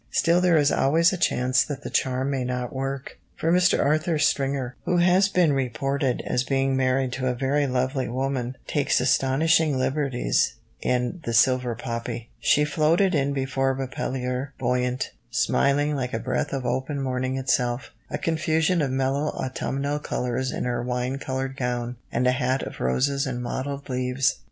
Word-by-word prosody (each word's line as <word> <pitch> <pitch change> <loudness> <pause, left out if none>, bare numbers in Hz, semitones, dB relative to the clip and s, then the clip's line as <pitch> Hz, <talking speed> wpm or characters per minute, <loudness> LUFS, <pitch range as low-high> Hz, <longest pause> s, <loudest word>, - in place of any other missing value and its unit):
Still 170 +1 +3
there 180 -2 +4
is 145 -1 +3
always 165 +6 +3
a - - 0
chance 130 -5 +2
that 145 -1 -6
the - - -6
charm 130 +1 0
may 135 -2 -1
not 125 -1 -3
work, 135 0 -4 0.2
for 165 - 0
Mr. 180 0 +4
Arthur 155 +3 +2
Stringer, 135 -4 0
who 180 - +1
has 180 +3 +4
been 175 -6 +3
reported 135 +1 -1
as 125 - 0
being 135 0 +1
married 130 -1 +1
to 130 0 -2
a 125 - 0
very 140 +3 +1
lovely 130 +1 -1
woman, 130 0 -2
takes 145 -2 +1
astonishing 140 +4 +2
liberties 130 - 0 0.3
in 125 +7 0
The 115 - -2
Silver 125 0 +3
Poppy: 115 0 -5
"She 150 - +3
floated 165 +6 +2
in 140 -2 +1
before 135 -1 0
Reppellier, 130 0 -3
buoyant, 125 0 -1 0.2
smiling, 145 +2 +2
like 125 -3 -2
a - - -1
breath 140 - -2
of 135 -2 -3
open 135 +3 -1
morning 130 0 -1
itself, 125 -1 0 0.2
a - - -2
confusion 160 +1 +1
of 140 - 0
mellow 135 +3 0
autumnal 140 +2 -2
colours 125 -2 -2
in - - -3
her 120 -1 -1
wine 125 +2 -2
coloured 135 0 -3
gown, 125 -2 -3
and 125 - 0
a 125 - +5
hat 130 0 0
of - - -7
roses 135 - +1
and 125 -2 -3
mottled 140 +3 -4
leaves. 125 - 0
135 Hz, 165 wpm, -25 LUFS, 125-145 Hz, 0.3 s, a